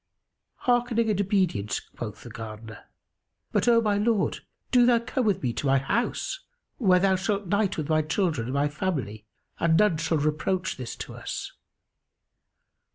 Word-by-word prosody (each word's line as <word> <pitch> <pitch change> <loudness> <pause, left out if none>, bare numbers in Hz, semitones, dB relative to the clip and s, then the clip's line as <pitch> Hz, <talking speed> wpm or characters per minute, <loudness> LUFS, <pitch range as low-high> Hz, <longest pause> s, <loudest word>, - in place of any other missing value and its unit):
"Hearkening 240 -2 +2
and 200 -1 +1
obedience," 185 - 0
quoth 105 -4 -8
the 120 - -10
Gardener; 110 -1 -9 0.7
"but, - - +1
O 235 -1 +6
my 205 -2 +1
lord, 215 -2 +1 0.3
do 245 -2 +5
thou 240 -1 +5
come 250 +2 -2
with 200 - +1
me 120 -2 0
to 140 - -2
my 135 0 +4
house, 240 - -1 0.4
where 190 -7 +5
thou 190 +1 +3
shalt 200 +2 -1
night 200 +2 +1
with 155 -3 -2
my 155 -1 +3
children 155 - -1
and 130 - -3
my 140 +1 +2
family 140 - -3 0.3
and 165 -1 +3
none 210 -5 +4
shall 160 +1 0
reproach 155 +5 -1
this 125 -3 -6
to - - -7
us." - - -5
180 Hz, 160 wpm, -26 LUFS, 135-210 Hz, 0.7 s, O